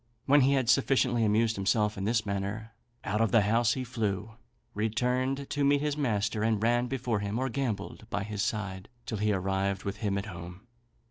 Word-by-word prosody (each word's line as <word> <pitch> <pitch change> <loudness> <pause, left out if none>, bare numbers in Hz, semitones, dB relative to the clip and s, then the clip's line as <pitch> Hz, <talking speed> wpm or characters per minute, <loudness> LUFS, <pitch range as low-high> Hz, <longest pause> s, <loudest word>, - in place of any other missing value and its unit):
When 145 +1 +5
he 135 +2 +4
had 130 -3 +1
sufficiently 125 -2 +3
amused 110 +1 +2
himself 105 +2 +1
in 95 - -4
this 110 0 +1
manner, 100 +3 -3 0.3
out 105 +3 -1
of 115 - +2
the 115 - +5
house 115 +2 +3
he 130 - -3
flew, 110 -4 -2 0.4
returned 125 +6 0
to 145 - 0
meet 140 0 +3
his 150 -1 0
master, 110 -6 0
and 110 -1 +2
ran 120 +2 +2
before 120 -4 -1
him, 100 +2 -3
or 130 +1 0
gambolled 115 -4 -4
by 100 - -2
his 105 -1 -4
side, 100 -2 -3 0.2
till 110 - -4
he 105 0 +2
arrived 95 0 -1
with 100 0 -4
him 100 -2 -1
at 100 - -3
home. 90 +1 -9
110 Hz, 195 wpm, -29 LUFS, 100-125 Hz, 0.4 s, When